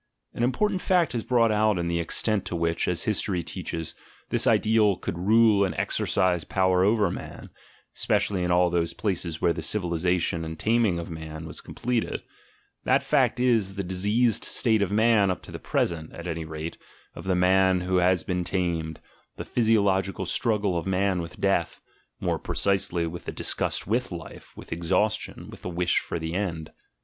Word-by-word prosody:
An - - -5
impor 130 - +2
tant 190 -3 -3
fact 175 -6 +2
is 115 -2 -2
brought 115 -3 +3
out 105 -1 +2
in 85 -1 -2
the 85 0 0
extent 100 +5 0
to - - -4
which, 85 0 0
as 90 -2 0
history 100 -4 0
teaches, 80 -1 -5 0.4
this - - +2
ideal 105 -2 +3
could - - -4
rule 105 +3 +4
and 90 -5 -1
exercise 90 -3 0
power 95 +3 +2
over 105 +1 +3
man, - - -8 0.4
especially 95 -3 +1
in 90 - -1
all 90 0 +3
those 85 -1 -1
places 85 -5 -2
where 85 - +4
the 80 - -5
civilisation 85 -1 0
and 80 0 -6
taming 110 -4 +2
of 85 0 -6
man 80 0 -7
was - - -7
completed: 120 -1 -3 0.6
that - - +2
fact 125 - +2
is, 115 -6 +2
the 100 - -3
dis 90 +1 -4
eased 115 +1 +2
state 110 -4 +2
of 100 - 0
man 110 -2 +4
up 90 - -3
to - - -11
the - - -7
present, 80 -2 -2
at 85 - -9
any 85 -2 -4
rate, 80 +1 -6 0.3
of - - -10
the 95 -1 +1
man 95 0 +3
who 90 +1 0
has 90 -1 +3
been 90 -1 -2
tamed, 85 -3 -2 0.4
the - - -6
physiological 100 -4 +1
struggle 105 -6 +1
of 85 +2 -2
man 95 -1 +1
with 85 +2 -9
death 95 -4 0 0.4
(more - - -1
precisely, 95 -3 0
with 85 +1 -7
the - - -4
disgust - - 0
with 120 +4 -1
life, 85 -2 -9
with - - -7
exhaustion, 105 +6 -1
with - - -12
the - - -5
wish 90 0 +1
for - - -5
the 80 0 -4
"end"). 85 -5 -3
95 Hz, 185 wpm, -26 LUFS, 85-105 Hz, 0.6 s, rule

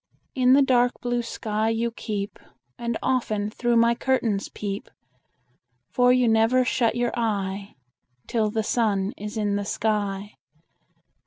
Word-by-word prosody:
In 255 -1 +4
the 280 +1 +6
dark 245 -2 +3
blue 245 0 -1
sky 220 -1 -2
you 230 +1 0
keep, 205 -3 -5 0.4
And 235 -1 -3
often 215 -5 0
through 240 +1 0
my 230 0 +5
curtains 235 -5 0
peep; 200 -1 -5 1.0
For 250 0 +4
you 250 -1 +3
never 225 +3 +3
shut 245 -4 +1
your 240 0 0
eye 200 -3 -2 0.5
Till 220 -3 0
the 220 +1 -1
sun 205 -4 0
is 210 +2 -6
in 205 -1 0
the 205 - -2
sky. 205 -1 -2
225 Hz, 140 wpm, -25 LUFS, 210-245 Hz, 1.0 s, the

